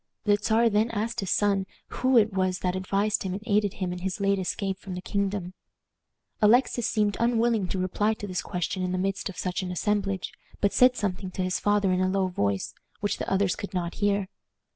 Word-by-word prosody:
The 205 Hz, -2 st, +4 dB
Czar 220 Hz, +3 st, +2 dB
then 215 Hz, +3 st, +2 dB
asked 230 Hz, +1 st, -2 dB
his 195 Hz, -, -2 dB
son 200 Hz, -2 st, +2 dB, 0.2 s
who 255 Hz, 0 st, +2 dB
it 215 Hz, -2 st, +4 dB
was 185 Hz, -1 st, +1 dB
that 180 Hz, 0 st, 0 dB
advised 195 Hz, +3 st, 0 dB
him 190 Hz, -1 st, -3 dB
and 200 Hz, +3 st, -5 dB
aided 205 Hz, -3 st, +2 dB
him 185 Hz, -2 st, -2 dB
in 180 Hz, -, -6 dB
his 190 Hz, +2 st, -3 dB
late 200 Hz, 0 st, +2 dB
escape 190 Hz, +1 st, -2 dB
from 190 Hz, -2 st, -7 dB
the -, -, -4 dB
kingdom. 200 Hz, -2 st, -2 dB, 0.9 s
Alexis 235 Hz, +2 st, +4 dB
seemed 210 Hz, -3 st, +1 dB
unwilling 235 Hz, -3 st, +2 dB
to 190 Hz, -, -3 dB
reply 205 Hz, +4 st, 0 dB
to 205 Hz, -, -7 dB
this 185 Hz, -3 st, -2 dB
question 180 Hz, +1 st, -3 dB
in 180 Hz, 0 st, -1 dB
the -, -, 0 dB
midst 195 Hz, +2 st, -1 dB
of 195 Hz, -, -9 dB
such 180 Hz, 0 st, -2 dB
an 185 Hz, -, -4 dB
assemblage, 195 Hz, 0 st, -1 dB, 0.3 s
but 200 Hz, -, +1 dB
said 250 Hz, 0 st, +5 dB
something 190 Hz, -3 st, -2 dB
to 185 Hz, 0 st, -3 dB
his 185 Hz, 0 st, 0 dB
father 205 Hz, -2 st, +2 dB
in 185 Hz, 0 st, +1 dB
a 185 Hz, -, +2 dB
low 195 Hz, 0 st, +1 dB
voice, 100 Hz, -, -1 dB, 0.3 s
which 205 Hz, -, -1 dB
the -, -, -3 dB
others 195 Hz, -1 st, +2 dB
could 200 Hz, -1 st, -7 dB
not 170 Hz, -1 st, -2 dB
hear. 200 Hz, -1 st, +2 dB
195 Hz, 215 wpm, -27 LUFS, 185-210 Hz, 0.9 s, said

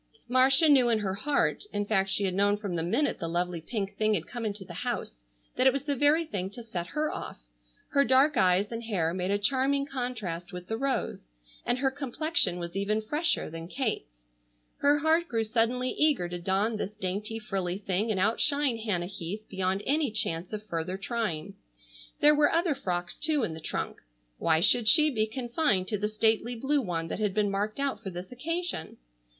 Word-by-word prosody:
Marcia 260 Hz, +5 st, +5 dB
knew 265 Hz, -5 st, +5 dB
in 230 Hz, -, +3 dB
her 200 Hz, -3 st, -2 dB
heart, 280 Hz, -, 0 dB
in 205 Hz, 0 st, -1 dB
fact 195 Hz, -2 st, +2 dB
she 200 Hz, -, +1 dB
had 190 Hz, -2 st, 0 dB
known 205 Hz, +2 st, +2 dB
from 200 Hz, -4 st, -4 dB
the 165 Hz, -, 0 dB
minute 185 Hz, -, 0 dB
the 165 Hz, -, -3 dB
lovely 175 Hz, 0 st, -1 dB
pink 200 Hz, +2 st, -4 dB
thing 215 Hz, 0 st, +2 dB
had 165 Hz, -4 st, -2 dB
come 240 Hz, -1 st, -6 dB
into 200 Hz, -2 st, -4 dB
the -, -, -9 dB
house, -, -, -4 dB, 0.3 s
that 255 Hz, -, +4 dB
it -, -, +7 dB
was 275 Hz, -, -2 dB
the 285 Hz, -1 st, -1 dB
very 295 Hz, +5 st, +4 dB
thing 190 Hz, -, -3 dB
to 235 Hz, +4 st, -9 dB
set 180 Hz, -6 st, -5 dB
her 305 Hz, +7 st, -1 dB
off. -, -, -7 dB, 0.5 s
Her 280 Hz, -, +3 dB
dark 275 Hz, +2 st, +4 dB
eyes 190 Hz, +3 st, +3 dB
and 230 Hz, 0 st, -4 dB
hair 175 Hz, -7 st, 0 dB
made 185 Hz, 0 st, -2 dB
a 200 Hz, -, +2 dB
charming 270 Hz, +6 st, +2 dB
contrast 225 Hz, -11 st, -4 dB
with 180 Hz, -1 st, -7 dB
the 225 Hz, -, -3 dB
rose, 260 Hz, -, -2 dB, 0.4 s
and 245 Hz, -, +2 dB
her 265 Hz, +1 st, +1 dB
complexion 275 Hz, -, 0 dB
was 170 Hz, 0 st, -6 dB
even 210 Hz, +2 st, 0 dB
fresher 300 Hz, +9 st, 0 dB
than 165 Hz, +1 st, -7 dB
Kate's. 185 Hz, -, -4 dB, 0.5 s
Her 290 Hz, +1 st, +3 dB
heart 320 Hz, +3 st, +2 dB
grew 225 Hz, -5 st, 0 dB
suddenly 240 Hz, +3 st, +1 dB
eager 295 Hz, -, +2 dB
to 175 Hz, 0 st, -5 dB
don 195 Hz, +5 st, 0 dB
this 210 Hz, 0 st, -4 dB
dainty, 210 Hz, +3 st, -3 dB
frilley 190 Hz, -4 st, -3 dB
thing 200 Hz, +2 st, -1 dB
and 205 Hz, -3 st, 0 dB
outshine 260 Hz, +5 st, +2 dB
Hannah 205 Hz, -6 st, -1 dB
Heath 195 Hz, +3 st, -6 dB
beyond 190 Hz, +1 st, -1 dB
any 295 Hz, 0 st, +1 dB
chance 175 Hz, -5 st, -2 dB
of 215 Hz, -1 st, -5 dB
further 175 Hz, -1 st, -3 dB
trying. 200 Hz, -5 st, -3 dB, 0.7 s
There 295 Hz, +1 st, +7 dB
were 295 Hz, 0 st, +4 dB
other 335 Hz, -1 st, +2 dB
frocks, 175 Hz, -9 st, -3 dB
too, 300 Hz, -4 st, +1 dB
in 165 Hz, -, -2 dB
the 160 Hz, -, -7 dB
trunk. -, -, -4 dB, 0.4 s
Why 160 Hz, -1 st, +3 dB
should 220 Hz, +4 st, +4 dB
she 305 Hz, +4 st, +6 dB
be 220 Hz, -4 st, 0 dB
confined 235 Hz, -, 0 dB
to 210 Hz, -, 0 dB
the 210 Hz, +1 st, -1 dB
stately 220 Hz, +2 st, +1 dB
blue 275 Hz, +5 st, +1 dB
one 170 Hz, -6 st, -3 dB
that -, -, -4 dB
had 205 Hz, -2 st, 0 dB
been 210 Hz, -2 st, +1 dB
marked 205 Hz, +5 st, -2 dB
out 275 Hz, -1 st, -1 dB
for 195 Hz, -, -5 dB
this 180 Hz, +2 st, -8 dB
occasion? 330 Hz, -, -3 dB
215 Hz, 200 wpm, -28 LUFS, 185-265 Hz, 0.7 s, it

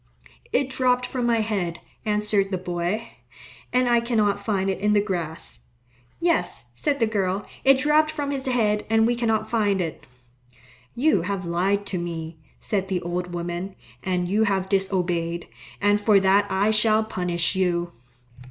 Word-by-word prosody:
"It 265 Hz, 0 st, +1 dB
dropped 250 Hz, -1 st, +2 dB
from 250 Hz, -1 st, -2 dB
my 230 Hz, -1 st, +3 dB
head," 195 Hz, -6 st, -2 dB, 0.3 s
answered 210 Hz, -2 st, +1 dB
the 190 Hz, -, -1 dB
boy, 180 Hz, +4 st, -3 dB, 0.6 s
"and 250 Hz, 0 st, +2 dB
I 240 Hz, -1 st, +4 dB
cannot 215 Hz, -4 st, 0 dB
find 195 Hz, -3 st, 0 dB
it 190 Hz, -1 st, -1 dB
in 210 Hz, +1 st, +2 dB
the 210 Hz, -, +5 dB
grass." 160 Hz, -, -3 dB, 0.5 s
"Yes," 335 Hz, -1 st, 0 dB
said 290 Hz, -2 st, -1 dB
the 230 Hz, -, +4 dB
girl, 200 Hz, -2 st, -1 dB, 0.2 s
"it 270 Hz, 0 st, +6 dB
dropped 300 Hz, +3 st, +3 dB
from 290 Hz, -2 st, -3 dB
his 270 Hz, -1 st, -3 dB
head, 215 Hz, -4 st, +1 dB
and 225 Hz, 0 st, +4 dB
we 240 Hz, -, +2 dB
cannot 225 Hz, -2 st, 0 dB
find 205 Hz, -4 st, +1 dB
it." 165 Hz, -4 st, -4 dB, 0.9 s
"You 265 Hz, -, +3 dB
have 190 Hz, +1 st, -3 dB
lied 190 Hz, +4 st, 0 dB
to 195 Hz, -2 st, -2 dB
me," 165 Hz, -1 st, -5 dB, 0.2 s
said 195 Hz, -3 st, -1 dB
the 185 Hz, -2 st, -2 dB
old 175 Hz, +1 st, -3 dB
woman, 175 Hz, +2 st, -4 dB, 0.3 s
"and 180 Hz, -1 st, -1 dB
you 210 Hz, +4 st, +2 dB
have 190 Hz, -2 st, 0 dB
disobeyed, 175 Hz, -4 st, 0 dB, 0.3 s
and 205 Hz, 0 st, +3 dB
for 205 Hz, -1 st, +5 dB
that 195 Hz, +1 st, +3 dB
I 200 Hz, +3 st, +2 dB
shall 215 Hz, 0 st, +3 dB
punish 180 Hz, -5 st, -1 dB
you." 175 Hz, -2 st, 0 dB
200 Hz, 160 wpm, -24 LUFS, 180-225 Hz, 0.9 s, it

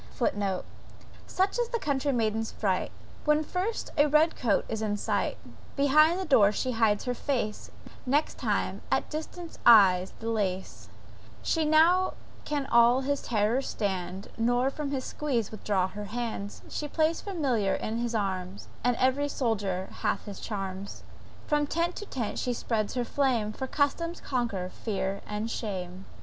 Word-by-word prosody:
* -, -, -19 dB
(*Footnote. 200 Hz, -6 st, -1 dB, 0.6 s
"Such 385 Hz, +5 st, 0 dB
is 480 Hz, -1 st, 0 dB
the 470 Hz, -, 0 dB
country 285 Hz, -, 0 dB
maiden's 225 Hz, -2 st, 0 dB
fright, 190 Hz, -3 st, -1 dB, 0.3 s
When 300 Hz, 0 st, +3 dB
first 370 Hz, +8 st, -3 dB
a 290 Hz, -, +6 dB
red 305 Hz, +3 st, +4 dB
coat 220 Hz, -6 st, +1 dB
is 220 Hz, -1 st, -3 dB
in 210 Hz, -1 st, 0 dB
sight; -, -, -1 dB, 0.4 s
Behind 305 Hz, +5 st, +5 dB
the 380 Hz, -, -2 dB
door 215 Hz, -, +5 dB
she 255 Hz, +4 st, -1 dB
hides 225 Hz, -3 st, +2 dB
her 250 Hz, -, 0 dB
face, 240 Hz, -5 st, -2 dB, 0.4 s
Next 290 Hz, +4 st, +1 dB
time -, -, -1 dB
at -, -, +1 dB
distance 320 Hz, +2 st, -6 dB
eyes 190 Hz, -5 st, +7 dB
the 225 Hz, -, -6 dB
lace: 190 Hz, -4 st, -2 dB, 0.5 s
She 320 Hz, -2 st, +1 dB
now 335 Hz, +5 st, +4 dB, 0.3 s
can 290 Hz, -2 st, -1 dB
all 235 Hz, 0 st, +5 dB
his 285 Hz, +1 st, -1 dB
terrors 230 Hz, +4 st, +1 dB
stand, 190 Hz, -2 st, -3 dB
Nor 245 Hz, +3 st, +2 dB
from 295 Hz, 0 st, -4 dB
his 270 Hz, -2 st, -2 dB
squeeze 250 Hz, -8 st, -1 dB
withdraws 195 Hz, -3 st, 0 dB
her 210 Hz, 0 st, -6 dB
hand, 220 Hz, -2 st, -4 dB
She 300 Hz, -, -4 dB
plays 315 Hz, +2 st, +1 dB
familiar 265 Hz, -, 0 dB
in 220 Hz, +1 st, -3 dB
his 235 Hz, 0 st, -2 dB
arms, 190 Hz, -2 st, -3 dB
And 245 Hz, 0 st, +3 dB
every 260 Hz, +4 st, +2 dB
soldier 200 Hz, -8 st, -1 dB
hath -, -, -1 dB
his 200 Hz, -3 st, -7 dB
charms; 195 Hz, -2 st, -5 dB, 0.4 s
>From 295 Hz, -1 st, +1 dB
tent 335 Hz, +3 st, 0 dB
to 415 Hz, -, -6 dB
tent 235 Hz, -5 st, -3 dB
she 250 Hz, -, 0 dB
spreads 220 Hz, -2 st, -1 dB
her 245 Hz, -1 st, 0 dB
flame; 235 Hz, -6 st, +1 dB
For 265 Hz, -, -4 dB
custom 320 Hz, +5 st, 0 dB
conquers 225 Hz, -, -2 dB
fear 195 Hz, -2 st, -2 dB
and 210 Hz, +2 st, -3 dB
shame.") 190 Hz, -4 st, -4 dB
240 Hz, 160 wpm, -28 LUFS, 205-290 Hz, 0.6 s, eyes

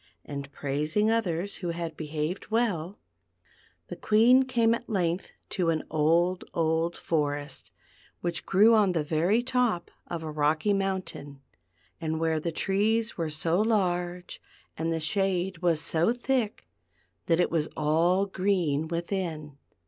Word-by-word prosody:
and 140 Hz, -1 st, -6 dB
praising 150 Hz, +11 st, 0 dB
others 200 Hz, -4 st, -1 dB
who 175 Hz, -, -4 dB
had 170 Hz, -1 st, -4 dB
behaved 155 Hz, +5 st, -4 dB
well, 205 Hz, -6 st, 0 dB, 0.9 s
the -, -, -6 dB
Queen 235 Hz, +5 st, +5 dB
came 235 Hz, -3 st, +2 dB
at 235 Hz, +1 st, -5 dB
length 180 Hz, -3 st, -1 dB, 0.2 s
to 175 Hz, -3 st, -1 dB
an 160 Hz, -1 st, 0 dB
old, 170 Hz, +4 st, +2 dB
old 165 Hz, +1 st, +1 dB
forest 145 Hz, -2 st, -2 dB, 0.5 s
which 170 Hz, -2 st, -3 dB
grew 210 Hz, +4 st, +5 dB
on 205 Hz, -4 st, +4 dB
the 160 Hz, -3 st, 0 dB
very 170 Hz, +10 st, +1 dB
top 250 Hz, -8 st, 0 dB, 0.2 s
of 170 Hz, -2 st, -5 dB
a 155 Hz, -, -4 dB
rocky 155 Hz, +6 st, +1 dB
mountain, 190 Hz, -8 st, -3 dB, 0.6 s
and 160 Hz, -1 st, -2 dB
where 160 Hz, -1 st, +1 dB
the 170 Hz, +2 st, -3 dB
trees 215 Hz, +6 st, 0 dB
were 165 Hz, -3 st, -2 dB
so 165 Hz, +5 st, +1 dB
large 180 Hz, -5 st, -1 dB, 0.3 s
and 165 Hz, +1 st, -2 dB
the 165 Hz, -, 0 dB
shade 185 Hz, +2 st, 0 dB
was 170 Hz, -3 st, +2 dB
so 165 Hz, +5 st, +1 dB
thick 245 Hz, -3 st, -1 dB, 0.6 s
that 165 Hz, 0 st, +3 dB
it 175 Hz, -, +2 dB
was 160 Hz, -2 st, 0 dB
all 170 Hz, +6 st, +2 dB
green 180 Hz, -6 st, 0 dB
within. 170 Hz, -3 st, -3 dB
175 Hz, 140 wpm, -28 LUFS, 160-200 Hz, 0.9 s, Queen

